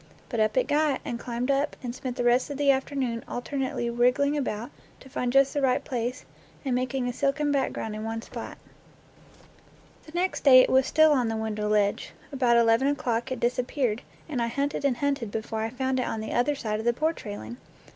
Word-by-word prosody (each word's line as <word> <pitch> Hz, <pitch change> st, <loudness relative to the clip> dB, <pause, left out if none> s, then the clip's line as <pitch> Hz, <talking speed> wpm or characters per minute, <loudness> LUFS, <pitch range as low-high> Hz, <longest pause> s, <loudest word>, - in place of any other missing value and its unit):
But 235 Hz, -, -2 dB
up 215 Hz, +1 st, +1 dB
it 255 Hz, -, +3 dB
got, 295 Hz, -2 st, +2 dB
and 235 Hz, -, -4 dB
climbed 245 Hz, +2 st, -2 dB
up, 275 Hz, +2 st, 0 dB
and 240 Hz, -1 st, -4 dB
spent 255 Hz, -1 st, -5 dB
the -, -, 0 dB
rest 245 Hz, +4 st, +3 dB
of 285 Hz, -, -5 dB
the 285 Hz, -1 st, +4 dB
afternoon 265 Hz, -3 st, -1 dB
alternately 260 Hz, -1 st, -3 dB
wriggling 250 Hz, +5 st, +2 dB
about 240 Hz, -5 st, -3 dB, 0.3 s
to 265 Hz, -, -14 dB
find 250 Hz, -1 st, -2 dB
just 275 Hz, +1 st, +4 dB
the 290 Hz, -, 0 dB
right 260 Hz, -2 st, +1 dB
place 245 Hz, 0 st, -3 dB, 0.4 s
and 265 Hz, -, 0 dB
making 255 Hz, 0 st, -1 dB
a 245 Hz, -, -2 dB
silken 285 Hz, +3 st, 0 dB
background 265 Hz, -5 st, -1 dB
in 215 Hz, -, -5 dB
one 225 Hz, 0 st, -4 dB
spot. -, -, -8 dB, 1.5 s
The -, -, -11 dB
next 360 Hz, +2 st, -1 dB
day 265 Hz, -3 st, +9 dB
it -, -, +1 dB
was 265 Hz, 0 st, +4 dB
still 315 Hz, +2 st, +5 dB
on 255 Hz, -5 st, +2 dB
the 225 Hz, 0 st, -2 dB
window 215 Hz, -1 st, -2 dB
ledge. 205 Hz, -1 st, +1 dB, 0.2 s
About 250 Hz, -4 st, +3 dB
eleven 230 Hz, +3 st, +4 dB
o'clock 255 Hz, -3 st, -1 dB
it 260 Hz, -, -2 dB
disappeared, 245 Hz, -1 st, 0 dB, 0.3 s
and 275 Hz, -7 st, -2 dB
I 235 Hz, -, +1 dB
hunted 280 Hz, +4 st, -2 dB
and 260 Hz, -4 st, +2 dB
hunted 275 Hz, -5 st, -1 dB
before 220 Hz, +1 st, -4 dB
I 220 Hz, -, -1 dB
found 260 Hz, +2 st, -1 dB
it 250 Hz, -, -1 dB
on 225 Hz, -, -3 dB
the 220 Hz, -, -5 dB
under 265 Hz, +5 st, +2 dB
side 215 Hz, -5 st, -3 dB
of 220 Hz, -, -5 dB
the 240 Hz, -, +4 dB
porch 315 Hz, +6 st, -1 dB
railing! 210 Hz, +2 st, -7 dB
250 Hz, 210 wpm, -27 LUFS, 235-275 Hz, 1.5 s, day